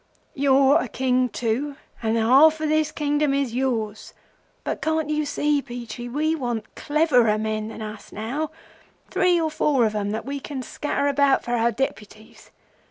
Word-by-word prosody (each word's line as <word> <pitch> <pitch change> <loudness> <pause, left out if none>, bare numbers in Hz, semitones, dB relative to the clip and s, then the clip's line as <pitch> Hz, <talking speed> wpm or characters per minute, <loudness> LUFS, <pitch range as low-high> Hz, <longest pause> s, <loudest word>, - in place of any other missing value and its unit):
'You're 275 +2 +4
a - - -3
King 255 +1 +1
too, 245 +6 -2 0.3
and 225 -1 0
the 230 - +2
half 285 +7 +6
of 310 - -1
this 310 0 +2
Kingdom 295 -1 0
is 275 -4 -1
yours; 230 -5 -2 0.5
but - - -3
can't 315 -1 0
you 305 0 0
see, 290 0 +1
Peachey, 240 -1 -7
we 305 +5 0
want 240 -8 -4
cleverer 255 -8 +2
men 215 0 -2
than 220 0 -7
us 215 0 -9
now—three 315 - -2
or 320 -1 0
four 285 -5 +2
of 215 - 0
'em 205 -1 -2
that 220 +2 -3
we 280 +1 -4
can 270 -2 -6
scatter 285 +2 -2
about 280 -1 +3
for 240 - -5
our 235 -1 +2
Deputies? 220 -3 -6
265 Hz, 165 wpm, -23 LUFS, 225-295 Hz, 0.5 s, half